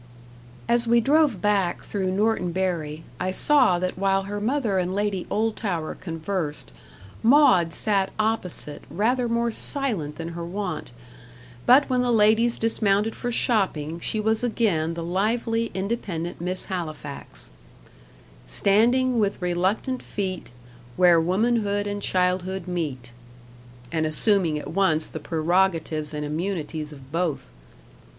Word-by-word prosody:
As 235 0 +2
we 235 +1 +5
drove 295 +3 +2
back 200 -4 +1
through 190 -2 -2
Norton 200 -2 +1
Bury, 165 -4 -2 0.2
I 185 - -1
saw 190 -2 +4
that 185 +1 -3
while 195 0 +2
her 205 +1 -5
mother 225 -4 0
and 180 +1 -2
Lady 200 -3 -1
Oldtower 205 -6 -1
conversed, 165 - -4 0.5
Maud 225 - +5
sat 195 +1 +1
opposite 215 -9 -2
rather 235 - 0
more 235 0 +1
silent 220 - -2
than 165 +2 -5
her 170 0 -6
wont; 190 -4 -4 0.8
but 265 +4 +6
when 255 -1 +1
the 245 -1 +1
ladies 225 +2 +4
dismounted 215 -1 +2
for 245 - -3
shopping, 170 -10 0
she 215 - -2
was 220 +2 0
again 185 -9 0
the 170 - -4
lively 225 +6 0
independent 190 -5 -3
Miss 180 +1 0
Halifax, 155 - -7 1.0
"Standing 235 - +3
with 205 -2 0
reluctant 185 +8 -1
feet, 185 - -4 0.5
Where 175 -2 +6
womanhood 205 +3 +1
and 205 0 -3
childhood 185 0 0
meet;" 145 -9 -4 0.8
and 160 -1 0
assuming 170 0 +2
at 150 - -6
once 165 -4 +2
the 155 - -7
prerogatives 165 -1 0
and 150 -1 -4
immunities 155 -1 -3
of 135 -2 -13
both. 165 - -2
190 Hz, 130 wpm, -24 LUFS, 165-220 Hz, 1.0 s, but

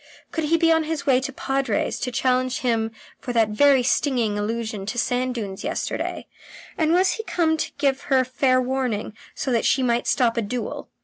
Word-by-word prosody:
Could 320 -2 -2
he 330 +2 +3
be 330 0 +3
on 320 -1 +3
his 315 -1 -3
way 260 -2 +4
to 270 +1 -4
the - - -23
Padre's 270 -5 -1
to 250 - -3
challenge 255 0 0
him 230 -3 +1 0.3
for 245 - -5
that 225 -2 +3
very 265 +4 +4
stinging 245 -4 +1
allusion 215 -1 -3
to 240 - -3
sand 250 +1 0
dunes 200 -5 -5
yesterday, 315 +3 -3 0.5
and 315 -2 +1
was 370 +2 +4
he 445 - -4
come 330 -6 +1
to - - -3
give 275 -1 +1
her 265 -2 +4
fair 255 0 +2
warning, 250 -5 -2 0.2
so 265 - -2
that 230 -2 +2
she 265 - +2
might 240 -1 +1
stop 235 -2 +2
a - - +2
duel? 230 +1 -4
255 Hz, 200 wpm, -23 LUFS, 230-280 Hz, 0.5 s, way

